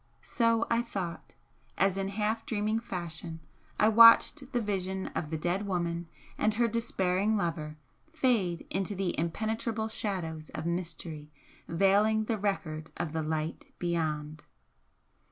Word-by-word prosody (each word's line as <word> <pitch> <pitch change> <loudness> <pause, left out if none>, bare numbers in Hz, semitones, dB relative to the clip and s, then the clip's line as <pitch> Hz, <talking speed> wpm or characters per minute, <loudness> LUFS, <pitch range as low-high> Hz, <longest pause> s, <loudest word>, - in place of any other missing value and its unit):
So 230 -1 +2
I 230 0 +2
thought, 190 -8 -5 0.4
as 195 -1 +3
in 195 0 -1
half 215 +3 -1
dreaming 215 0 0
fashion 170 -6 -6 0.4
I 215 - +6
watched 230 +5 +7
the 245 - +1
vision 190 -3 -2
of 155 - -4
the 160 - -2
dead 180 +6 -1
woman 170 -2 -1 0.3
and 215 -1 +2
her 235 +1 +3
despairing 210 -2 +1
lover 155 -5 -2 0.3
fade 230 - +1
into 195 +2 -1
the 190 -2 -1
impenetrable 220 +6 -1
shadows 165 -8 -4
of 155 - -4
mystery 165 -3 -4 0.4
veiling 200 +5 +3
the 220 -1 -2
record 160 -6 -2
of 155 - -3
the 160 - -1
light 155 +1 -3
beyond. 155 -3 -2
190 Hz, 135 wpm, -30 LUFS, 165-220 Hz, 0.4 s, watched